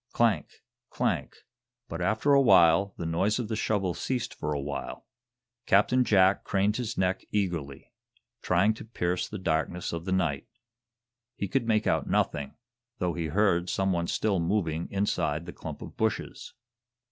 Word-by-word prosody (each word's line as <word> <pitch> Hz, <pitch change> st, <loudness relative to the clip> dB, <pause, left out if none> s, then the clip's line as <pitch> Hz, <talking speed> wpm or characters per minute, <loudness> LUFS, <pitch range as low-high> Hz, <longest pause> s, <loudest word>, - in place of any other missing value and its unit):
Clank! 110 Hz, -10 st, +2 dB, 0.4 s
clank! -, -, -1 dB, 0.5 s
But -, -, -5 dB
after 110 Hz, +7 st, +2 dB
a 140 Hz, -, +6 dB
while 95 Hz, -5 st, +5 dB
the 85 Hz, -, -4 dB
noise 95 Hz, +6 st, +1 dB
of 120 Hz, -4 st, -3 dB
the 110 Hz, -, -1 dB
shovel 100 Hz, -4 st, 0 dB
ceased 125 Hz, +3 st, -3 dB
for 75 Hz, -, -4 dB
a 75 Hz, -, -1 dB
while. 70 Hz, 0 st, -5 dB, 0.6 s
Captain 125 Hz, +6 st, +4 dB
Jack 95 Hz, -4 st, +4 dB
craned 100 Hz, +2 st, +1 dB
his 120 Hz, -2 st, -4 dB
neck 95 Hz, 0 st, 0 dB
eagerly, 85 Hz, -9 st, -3 dB, 0.5 s
trying 90 Hz, +5 st, +3 dB
to 110 Hz, -, -10 dB
pierce 90 Hz, -5 st, -2 dB
the 105 Hz, -, -5 dB
darkness 85 Hz, -1 st, -1 dB
of 85 Hz, 0 st, -5 dB
the 95 Hz, -, -3 dB
night. 80 Hz, -7 st, 0 dB, 0.9 s
He 100 Hz, -, -3 dB
could 115 Hz, +4 st, -1 dB
make 110 Hz, -1 st, +2 dB
out -, -, 0 dB
nothing, 70 Hz, -1 st, 0 dB, 0.4 s
though 90 Hz, -5 st, -1 dB
he 85 Hz, -2 st, -3 dB
heard 90 Hz, 0 st, +1 dB
some 95 Hz, 0 st, 0 dB
one 85 Hz, -1 st, -1 dB
still 100 Hz, -4 st, 0 dB
moving 85 Hz, -2 st, -1 dB
inside 85 Hz, -5 st, -1 dB
the 85 Hz, -, -8 dB
clump -, -, -8 dB
of -, -, -11 dB
bushes. -, -, -3 dB
95 Hz, 160 wpm, -28 LUFS, 85-105 Hz, 0.9 s, a